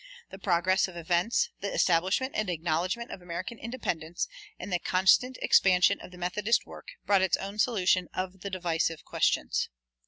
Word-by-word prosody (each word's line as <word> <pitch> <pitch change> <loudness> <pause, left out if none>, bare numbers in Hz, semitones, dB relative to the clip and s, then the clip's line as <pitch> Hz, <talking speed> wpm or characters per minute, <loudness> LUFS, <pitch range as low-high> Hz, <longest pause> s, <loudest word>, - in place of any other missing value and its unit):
The 190 - -9
progress 185 0 +2
of 180 -2 -10
events, 175 +6 +1
the 200 - -3
establishment 185 +10 +1
and 215 -3 -1
acknowledgment 175 +7 -1
of 185 - -8
American 180 +7 -6
independence, 175 -9 -3 0.3
and 185 +1 -6
the 175 - +2
constant 190 +9 +3
expansion 185 +1 +4
of - - -10
the 180 - -13
Methodist 205 +6 0
work, - - -12 0.2
brought 200 -2 +4
its 190 -3 +2
own 200 +2 -7
solution 185 -6 +2
of 185 +1 -4
the 200 - -5
divisive 170 -3 -1
questions. - - 0
185 Hz, 160 wpm, -28 LUFS, 175-200 Hz, 0.3 s, expansion